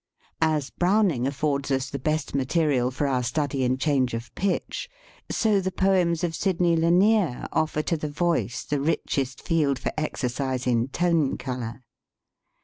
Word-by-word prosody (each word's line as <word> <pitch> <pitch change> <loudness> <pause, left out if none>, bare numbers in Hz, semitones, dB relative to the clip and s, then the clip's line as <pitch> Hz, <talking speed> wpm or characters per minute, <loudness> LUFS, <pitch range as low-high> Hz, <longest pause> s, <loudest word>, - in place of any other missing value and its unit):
As 155 -3 +1
Browning 180 - +2
affords 140 0 -1
us 135 0 -1
the 140 - -4
best 155 +3 -1
material 135 -2 +1
for 130 +3 -2
our 130 -2 +1
study 135 +2 -1
in 130 +1 +1
change 130 -4 +1
of 115 +1 -7
pitch, 195 -1 -2 0.4
so 210 -3 +2
the 190 0 -2
poems 180 -4 +2
of 170 -2 0
Sidney 175 -1 +1
Lanier 175 - +3
offer 155 -1 0
to 165 - 0
the 150 -1 -4
voice 145 - -1
the 145 -2 -1
rich 150 -1 0
est 130 -1 -3
field 150 -5 +2
for - - -3
exercise 130 -3 -2
in 120 -1 +2
tone 165 -1 +1
color. 125 -2 -5
145 Hz, 155 wpm, -25 LUFS, 130-170 Hz, 0.4 s, Lanier